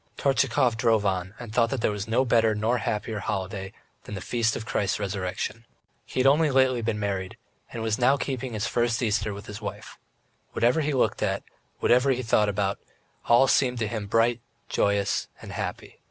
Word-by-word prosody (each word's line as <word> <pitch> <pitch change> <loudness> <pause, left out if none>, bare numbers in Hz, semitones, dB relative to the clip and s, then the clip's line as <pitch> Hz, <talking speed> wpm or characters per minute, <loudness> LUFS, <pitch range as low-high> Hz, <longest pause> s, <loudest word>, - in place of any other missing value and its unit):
Tortchakov 125 -3 +2
drove 115 -3 +2
on 95 0 -1
and 120 -3 -8
thought 115 0 +3
that 135 -3 -2
there - - +2
was 105 0 -4
no 120 +4 +2
better 115 -2 +3
nor 115 +4 +1
happier 105 +1 -2
holiday 95 0 -4 0.3
than - - -6
the - - -4
Feast 115 +3 0
of 110 - -5
Christ's 105 -5 -1
Resurrection. 100 +3 -3 0.4
He - - -4
had 130 - +3
only 150 +3 +5
lately 130 -2 +3
been 110 -1 -1
married, 95 -2 -3 0.3
and 115 - -5
was 110 -1 0
now 130 +3 +4
keeping 130 -3 -3
his 110 +1 -2
first 120 -1 +1
Easter 105 -1 0
with 100 +1 -8
his 105 +1 -8
wife. - - -7 0.5
Whatever 125 +7 +2
he 150 0 0
looked 130 - +1
at, - - 0 0.4
whatever 125 +3 +4
he 130 -1 +1
thought 105 -2 +3
about, 100 -1 -1
it - - -38 0.4
all 120 +3 +6
seemed 125 -1 +2
to 110 -2 -1
him 105 -2 -4
bright, 115 +2 +2 0.3
joyous, 100 0 +1
and - - -9
happy. - - -5
115 Hz, 195 wpm, -26 LUFS, 105-125 Hz, 0.5 s, all